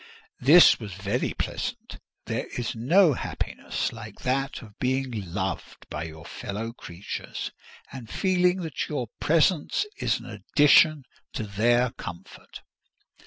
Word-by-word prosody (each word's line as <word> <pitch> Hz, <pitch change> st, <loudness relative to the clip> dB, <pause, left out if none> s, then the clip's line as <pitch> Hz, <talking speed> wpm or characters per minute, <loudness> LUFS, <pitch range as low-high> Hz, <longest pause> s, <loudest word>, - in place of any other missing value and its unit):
This 160 Hz, +7 st, +8 dB
was 105 Hz, -6 st, -7 dB
very 100 Hz, +6 st, -2 dB
pleasant; -, -, -4 dB, 0.3 s
there -, -, -3 dB
is 120 Hz, -2 st, -2 dB
no 155 Hz, -, +4 dB
happiness -, -, -3 dB
like 110 Hz, -2 st, -10 dB
that 135 Hz, +2 st, -1 dB
of 105 Hz, -3 st, -15 dB
being 125 Hz, -8 st, -1 dB
loved 95 Hz, 0 st, -4 dB
by 75 Hz, +1 st, -3 dB
your 80 Hz, 0 st, -10 dB
fellow 110 Hz, +6 st, -5 dB
creatures, 90 Hz, -4 st, -6 dB, 0.4 s
and 120 Hz, -4 st, -9 dB
feeling 180 Hz, -1 st, +2 dB
that 160 Hz, -3 st, -4 dB
your 125 Hz, -7 st, -3 dB
presence 165 Hz, -, +2 dB
is -, -, +1 dB
an -, -, -12 dB
addition 150 Hz, 0 st, +4 dB, 0.3 s
to -, -, -3 dB
their 120 Hz, +4 st, +2 dB
comfort. 85 Hz, -6 st, -10 dB
120 Hz, 125 wpm, -26 LUFS, 105-150 Hz, 0.4 s, This